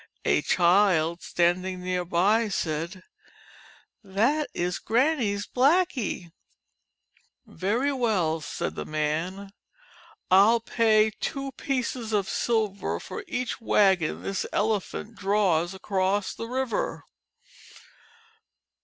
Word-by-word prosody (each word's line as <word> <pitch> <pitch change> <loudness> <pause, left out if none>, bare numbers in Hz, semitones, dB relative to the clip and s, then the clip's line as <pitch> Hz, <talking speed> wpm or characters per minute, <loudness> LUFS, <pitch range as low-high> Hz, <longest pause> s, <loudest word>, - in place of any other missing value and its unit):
A - - +3
child 175 -2 +3
standing 180 +1 0
near 180 0 -1
by 200 +6 +2
said, 170 +1 -3 1.0
"That 230 +10 +1
is 175 +1 -2
Granny's 235 -5 +1
Blackie." 260 - +1 1.1
"Very 235 +9 -1
well," 190 -11 0
said 150 - -4
the - - -5
man, 160 +6 -3 0.8
"I 185 - +8
'11 230 0 +3
pay 220 -2 +3
two 275 -2 -3
pieces 250 -4 -3
of 200 -2 +1
silver 215 -4 -1
for - - -7
each 250 -5 -3
wagon 190 -7 +2
this 195 -1 -2
Elephant 210 +1 -1
draws 195 -4 +1
across 190 +1 -1
the 230 - -6
river.' 255 -1 -2
200 Hz, 100 wpm, -26 LUFS, 180-230 Hz, 1.1 s, I